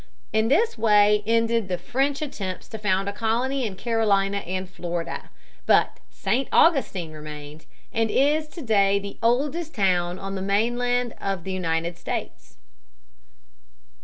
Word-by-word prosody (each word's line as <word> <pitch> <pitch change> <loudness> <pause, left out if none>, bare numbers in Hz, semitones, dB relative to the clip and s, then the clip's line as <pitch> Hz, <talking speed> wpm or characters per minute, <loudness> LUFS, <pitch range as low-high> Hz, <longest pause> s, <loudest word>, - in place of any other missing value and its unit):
In 220 0 +2
this 305 - +2
way 210 -1 +5
ended 230 -1 +2
the 180 -1 -1
French 270 - -1
attempts 195 -10 -5
to 220 - -7
found 195 -1 +1
a 200 - -2
colony 240 +4 0
in 195 - -7
Carolina 200 -2 +1
and 185 0 -4
Florida. 175 -2 -5 0.4
But - - +3
St. 265 +3 -1
Augustine 205 - +3
remained, 150 0 -9 0.3
and 225 -1 +1
is 300 +6 +2
to 325 +1 -9
day 200 -4 +3
the 200 0 -6
oldest 290 +8 0
town 180 -4 +1
on 195 +1 -6
the 190 - -4
mainland 240 +4 +1
of 195 -3 -2
the 190 - -5
United 170 -2 -2
States. - - -6
205 Hz, 140 wpm, -24 LUFS, 185-240 Hz, 0.4 s, way